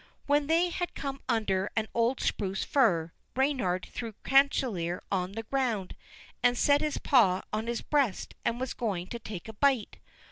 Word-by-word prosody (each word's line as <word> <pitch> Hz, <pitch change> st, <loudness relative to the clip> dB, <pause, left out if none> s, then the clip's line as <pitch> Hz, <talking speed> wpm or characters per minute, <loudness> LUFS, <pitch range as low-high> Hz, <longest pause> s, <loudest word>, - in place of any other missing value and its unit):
When 285 Hz, 0 st, +2 dB
they 335 Hz, +3 st, +3 dB
had 355 Hz, 0 st, -3 dB
come 275 Hz, -1 st, -4 dB
under 200 Hz, -5 st, +1 dB
an 220 Hz, -1 st, 0 dB
old 235 Hz, +3 st, +1 dB
spruce 195 Hz, -1 st, -1 dB
fir, 175 Hz, -, +2 dB, 0.2 s
Reynard 250 Hz, -10 st, 0 dB
threw 230 Hz, -3 st, -5 dB
Chanticleer 245 Hz, -11 st, +2 dB
on 185 Hz, -1 st, -1 dB
the 225 Hz, +2 st, -4 dB
ground, 230 Hz, -6 st, -1 dB, 0.5 s
and 245 Hz, 0 st, +3 dB
set 285 Hz, +3 st, +4 dB
his 305 Hz, -1 st, -1 dB
paw 195 Hz, -9 st, +4 dB
on 215 Hz, +2 st, -2 dB
his 235 Hz, -1 st, -2 dB
breast, 275 Hz, -10 st, 0 dB
and 235 Hz, -, 0 dB
was 260 Hz, -1 st, -3 dB
going 195 Hz, -7 st, -2 dB
to 235 Hz, -, -5 dB
take 210 Hz, -4 st, -7 dB
a 220 Hz, -, -7 dB
bite. 260 Hz, -1 st, +1 dB
235 Hz, 170 wpm, -29 LUFS, 195-275 Hz, 0.5 s, set